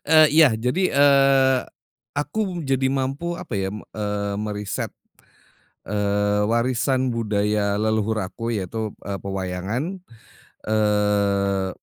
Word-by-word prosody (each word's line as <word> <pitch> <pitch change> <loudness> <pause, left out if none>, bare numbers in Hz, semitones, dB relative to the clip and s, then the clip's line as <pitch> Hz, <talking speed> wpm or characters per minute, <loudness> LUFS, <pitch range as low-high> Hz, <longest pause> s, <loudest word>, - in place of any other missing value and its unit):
Eee, 155 0 +7
iya, 155 -7 +6
jadi, 125 +11 0
eee, 135 -2 +5 0.6
aku 180 +3 -2
jadi 135 0 +1
mampu 140 +6 -2
apa 170 -11 -6
ya, 95 -1 -1
me 105 0 -8
eee, 105 -1 -2
meriset, 105 -1 -3 1.0
eee, 105 0 +1
warisan 125 +3 +1
budaya 105 -2 0
leluhur 110 0 0
aku 115 +5 -4
yaitu, 105 +2 -3
eee, 100 -1 -3
pewayangan. 100 - -3 0.7
Eee, 100 -2 +1
110 Hz, 105 wpm, -23 LUFS, 100-135 Hz, 1.0 s, Eee